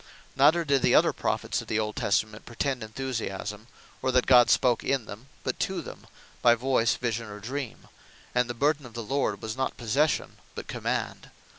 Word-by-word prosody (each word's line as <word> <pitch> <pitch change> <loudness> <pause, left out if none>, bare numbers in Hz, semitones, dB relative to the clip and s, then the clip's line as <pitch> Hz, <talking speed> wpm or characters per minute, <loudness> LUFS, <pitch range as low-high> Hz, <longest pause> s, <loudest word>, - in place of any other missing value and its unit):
Neither 155 +5 +4
did 140 -2 +2
the - - +4
other - - +5
Prophets - - -1
of - - -12
the 110 - -1
old 105 -1 -1
Testament 105 +1 0
pretend 125 +2 -2
Enthusiasme; 110 -3 -5 0.3
or, 130 - +1
that 125 -1 +3
God 125 -2 +7
spake 120 -2 +3
in 135 -4 0
them; 110 +6 -10 0.2
but - - -3
to - - -1
them - - -11 0.3
by 120 -1 +6
Voyce, 120 -2 +2
Vision, 115 -2 -3
or 105 0 -8
Dream; 125 +3 -6 0.5
and 125 -1 +1
the 120 - -3
Burthen 145 +1 +1
Of 115 - -16
The 115 - -4
Lord 115 -4 -1
was 110 0 -4
not 130 0 -2
Possession, 135 +6 0 0.2
but - - -6
Command. - - -3
120 Hz, 185 wpm, -27 LUFS, 110-135 Hz, 0.5 s, God